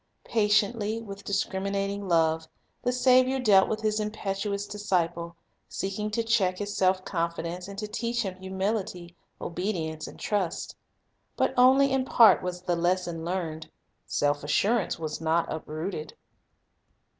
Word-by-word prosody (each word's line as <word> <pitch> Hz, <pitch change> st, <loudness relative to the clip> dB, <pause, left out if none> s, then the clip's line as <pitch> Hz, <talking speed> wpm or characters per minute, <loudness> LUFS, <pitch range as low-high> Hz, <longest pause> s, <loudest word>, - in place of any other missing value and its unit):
Patiently, 215 Hz, 0 st, +1 dB
with 200 Hz, -3 st, -9 dB
discriminating 200 Hz, 0 st, -2 dB
love, 160 Hz, -2 st, +2 dB, 0.3 s
the 245 Hz, -, +1 dB
Saviour 255 Hz, +1 st, +4 dB
dealt 205 Hz, -6 st, +5 dB
with 220 Hz, 0 st, -2 dB
His 215 Hz, 0 st, +1 dB
impetuous 205 Hz, -1 st, -2 dB
disciple, 175 Hz, -5 st, -1 dB, 0.3 s
seeking 195 Hz, +2 st, -3 dB
to 230 Hz, +2 st, -1 dB
check 200 Hz, -6 st, +2 dB
his 205 Hz, +1 st, -4 dB
self 185 Hz, 0 st, +2 dB
confidence, 170 Hz, 0 st, -3 dB
and 200 Hz, 0 st, -9 dB
to 210 Hz, +1 st, -3 dB
teach 235 Hz, +2 st, -2 dB
him 190 Hz, -2 st, -3 dB
humility, 190 Hz, -2 st, -3 dB, 0.2 s
obedience, 165 Hz, -4 st, -3 dB
and -, -, -11 dB
trust. 195 Hz, -5 st, -2 dB, 0.6 s
But -, -, +2 dB
only 265 Hz, +2 st, +6 dB
in 265 Hz, -1 st, +2 dB
part 225 Hz, -6 st, +6 dB
was 180 Hz, 0 st, -4 dB
the 180 Hz, -1 st, 0 dB
lesson 175 Hz, -1 st, 0 dB
learned. 165 Hz, -3 st, -3 dB, 0.4 s
Self 145 Hz, 0 st, 0 dB
assurance 200 Hz, +7 st, +1 dB
was 155 Hz, -1 st, -5 dB
not 165 Hz, +1 st, +2 dB
uprooted. 155 Hz, +1 st, -5 dB
195 Hz, 135 wpm, -27 LUFS, 170-215 Hz, 0.6 s, only